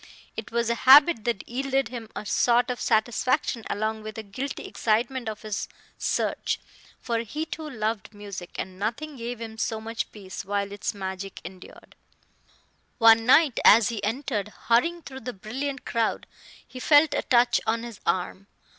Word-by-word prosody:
It 220 Hz, -, -6 dB
was 235 Hz, 0 st, +1 dB
a 235 Hz, +2 st, -1 dB
habit 280 Hz, -4 st, +8 dB
that 235 Hz, -5 st, -2 dB
yielded 270 Hz, +2 st, -1 dB
him 235 Hz, -3 st, -7 dB
a -, -, -5 dB
sort 245 Hz, +4 st, +3 dB
of 245 Hz, -, -5 dB
satisfaction 240 Hz, +2 st, +1 dB
along 215 Hz, +1 st, -2 dB
with 215 Hz, 0 st, -8 dB
the 220 Hz, -, -6 dB
guilty 255 Hz, +8 st, -5 dB
excitement 230 Hz, +4 st, 0 dB
of 215 Hz, +1 st, -7 dB
his 210 Hz, -2 st, -3 dB, 0.3 s
search; -, -, -1 dB, 0.4 s
for 235 Hz, -2 st, -1 dB
he 290 Hz, +8 st, -4 dB
too 315 Hz, -1 st, -6 dB
loved 220 Hz, -5 st, -3 dB
music, 200 Hz, -4 st, -8 dB
and 185 Hz, 0 st, -6 dB
nothing 280 Hz, +9 st, -3 dB
gave 240 Hz, 0 st, -5 dB
him 225 Hz, -1 st, -7 dB
so 220 Hz, 0 st, -1 dB
much 225 Hz, +1 st, -4 dB
peace 195 Hz, -3 st, -8 dB
while 200 Hz, 0 st, -2 dB
its 205 Hz, 0 st, -3 dB
magic 190 Hz, 0 st, -5 dB
endured. 185 Hz, +1 st, -12 dB, 1.0 s
One 225 Hz, 0 st, +6 dB
night 285 Hz, -1 st, +5 dB
as 220 Hz, 0 st, +7 dB
he 220 Hz, -4 st, -4 dB
entered, 215 Hz, -2 st, -2 dB, 0.2 s
hurrying 335 Hz, +9 st, +3 dB
through 265 Hz, -2 st, -8 dB
the 250 Hz, -1 st, -6 dB
brilliant 265 Hz, +7 st, -5 dB
crowd, 230 Hz, -2 st, -1 dB, 0.4 s
he 255 Hz, -, -9 dB
felt 295 Hz, +3 st, +5 dB
a -, -, +1 dB
touch 240 Hz, -1 st, +3 dB
on 230 Hz, +1 st, 0 dB
his 235 Hz, -3 st, -8 dB
arm. 185 Hz, +2 st, -2 dB
230 Hz, 165 wpm, -26 LUFS, 210-255 Hz, 1.0 s, habit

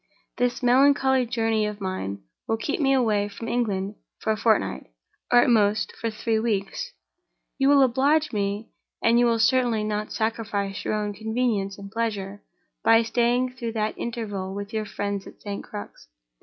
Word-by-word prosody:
"This 245 Hz, +1 st, 0 dB
melancholy 265 Hz, 0 st, +4 dB
journey 225 Hz, -2 st, +1 dB
of 210 Hz, 0 st, -6 dB
mine 145 Hz, -, -4 dB, 0.2 s
will 225 Hz, -, +1 dB
keep 290 Hz, +7 st, -2 dB
me 270 Hz, -1 st, +3 dB
away 220 Hz, -6 st, +2 dB
from 215 Hz, +3 st, -8 dB
England 205 Hz, -4 st, -1 dB, 0.2 s
for 220 Hz, -, -1 dB
a -, -, +2 dB
fortnight, 220 Hz, -, +1 dB, 0.4 s
or, 245 Hz, 0 st, +7 dB
at -, -, +2 dB
most, 215 Hz, -1 st, +2 dB
for 230 Hz, 0 st, -2 dB
three 220 Hz, +1 st, -1 dB
weeks. 210 Hz, -4 st, -2 dB, 0.7 s
You 270 Hz, 0 st, +4 dB
will 280 Hz, -1 st, +6 dB
oblige 280 Hz, +4 st, +2 dB
me—and 210 Hz, +3 st, -1 dB
you 240 Hz, -, +4 dB
will 230 Hz, -1 st, +2 dB
certainly 235 Hz, -1 st, +2 dB
not 210 Hz, 0 st, -2 dB
sacrifice 215 Hz, -3 st, -2 dB
your -, -, -1 dB
own 210 Hz, -1 st, -2 dB
convenience 220 Hz, -2 st, -1 dB
and 200 Hz, -1 st, -10 dB
pleasure—by 220 Hz, +1 st, -1 dB
staying 245 Hz, +2 st, +1 dB
through 235 Hz, -3 st, -5 dB
that 215 Hz, -1 st, -1 dB
interval 205 Hz, -5 st, -4 dB
with 205 Hz, +1 st, -6 dB
your 215 Hz, -1 st, -1 dB
friends 200 Hz, -1 st, -4 dB
at -, -, -13 dB
St. 200 Hz, -1 st, -5 dB
Crux. 100 Hz, -11 st, -9 dB
220 Hz, 160 wpm, -25 LUFS, 205-240 Hz, 0.7 s, or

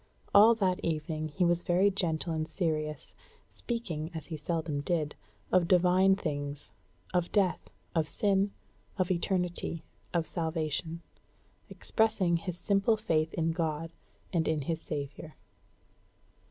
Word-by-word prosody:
All 220 Hz, +3 st, +8 dB
that 190 Hz, -3 st, +1 dB
evening 155 Hz, -1 st, -2 dB
he 165 Hz, +4 st, 0 dB
was 175 Hz, 0 st, +2 dB
very 185 Hz, +4 st, +3 dB
gentle 170 Hz, -3 st, -1 dB
and 155 Hz, 0 st, -2 dB
serious, 155 Hz, -5 st, -2 dB, 0.4 s
speaking, 170 Hz, -10 st, -3 dB
as 160 Hz, -2 st, -5 dB
he 165 Hz, -, -5 dB
seldom 155 Hz, -1 st, -2 dB
did, 150 Hz, -1 st, -1 dB, 0.4 s
of 180 Hz, -2 st, +4 dB
divine 185 Hz, +2 st, +5 dB
things, 145 Hz, -5 st, -4 dB, 0.4 s
of 175 Hz, -1 st, +1 dB
death, 195 Hz, -4 st, +1 dB, 0.2 s
of 160 Hz, -2 st, +1 dB
sin, 200 Hz, -1 st, +2 dB, 0.5 s
of 185 Hz, -1 st, +1 dB
eternity, 175 Hz, -2 st, -1 dB, 0.3 s
of 170 Hz, -2 st, +1 dB
salvation; 160 Hz, 0 st, -2 dB, 0.7 s
expressing 215 Hz, -6 st, +1 dB
his 175 Hz, +1 st, -5 dB
simple 200 Hz, +4 st, +2 dB
faith 160 Hz, -7 st, +1 dB
in 165 Hz, -1 st, +1 dB
God 165 Hz, -1 st, -2 dB, 0.4 s
and 165 Hz, -2 st, +1 dB
in 155 Hz, -2 st, 0 dB
his 160 Hz, +3 st, -2 dB
Savior. 145 Hz, +1 st, -6 dB
170 Hz, 125 wpm, -30 LUFS, 155-185 Hz, 0.7 s, All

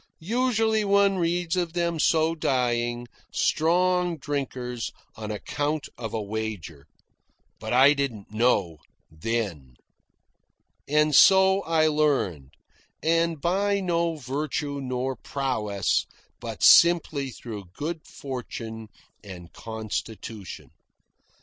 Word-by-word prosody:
Usually 225 Hz, +2 st, +1 dB
one 200 Hz, -1 st, +3 dB
reads 175 Hz, 0 st, 0 dB
of 175 Hz, -2 st, -1 dB
them 170 Hz, -2 st, -1 dB
so 160 Hz, +1 st, +3 dB
dying, 120 Hz, -5 st, -1 dB, 0.2 s
strong 180 Hz, +1 st, +1 dB
drinkers, 130 Hz, -5 st, -4 dB, 0.2 s
on 110 Hz, -1 st, -6 dB
account 145 Hz, +8 st, -3 dB
of 115 Hz, -3 st, -6 dB
a 110 Hz, -, -2 dB
wager. 100 Hz, -9 st, -5 dB, 0.7 s
But 110 Hz, -, -6 dB
I 135 Hz, +4 st, +6 dB
didn't 130 Hz, -9 st, -4 dB
know 105 Hz, -8 st, +1 dB, 0.3 s
then. 80 Hz, -, -3 dB, 1.1 s
And 150 Hz, +1 st, +2 dB
so 190 Hz, +5 st, +6 dB
I 160 Hz, -1 st, +2 dB
learned; 135 Hz, -, +1 dB, 0.5 s
and 165 Hz, -1 st, +1 dB
by 200 Hz, +5 st, +1 dB
no 170 Hz, -3 st, 0 dB
virtue 145 Hz, +1 st, -3 dB
nor 130 Hz, 0 st, -2 dB
prowess, 105 Hz, -, -1 dB, 0.3 s
but -, -, -6 dB
simply 160 Hz, -5 st, +5 dB
through 110 Hz, -5 st, -8 dB
good 160 Hz, +1 st, -5 dB
fortune 115 Hz, -4 st, -7 dB, 0.4 s
and 90 Hz, -4 st, -11 dB
constitution. 110 Hz, -2 st, -6 dB
140 Hz, 100 wpm, -26 LUFS, 110-170 Hz, 1.1 s, I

